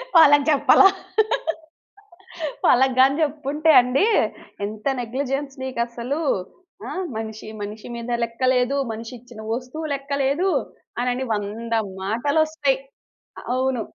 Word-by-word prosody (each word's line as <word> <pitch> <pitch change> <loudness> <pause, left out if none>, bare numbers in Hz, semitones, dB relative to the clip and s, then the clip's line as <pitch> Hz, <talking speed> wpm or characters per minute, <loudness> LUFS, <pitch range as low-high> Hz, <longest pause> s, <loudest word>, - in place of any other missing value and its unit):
వాళ్ళకి 290 -3 +7
జెప్పలా. 310 +6 +6 1.8
వాళ్ళగ్గాని 260 +1 +5
జెప్పుంటే 300 +1 +1
అండి 250 +9 +1 0.6
ఎంత 215 +1 -8 0.2
నెగ్లిజెన్స్ 270 +3 -3
నీకసలు? 245 +3 -3 0.7
ఆ? - - -5 0.3
మనిషి, 220 -1 -6
మనిషి 210 +1 -7
మీద 235 +1 -5
లెక్కలేదు, 250 +3 +1 0.2
మనిషిచ్చిన 230 +1 -9
వస్తువు 255 +6 -5
లెక్కలేదు, 280 +5 0 0.5
అనని 250 +1 -1
100 215 +3 -4 0.3
మాటలొస్తయి. 285 +6 +1 0.8
అవును. 260 -2 0
255 Hz, 85 wpm, -23 LUFS, 235-280 Hz, 1.8 s, వాళ్ళకి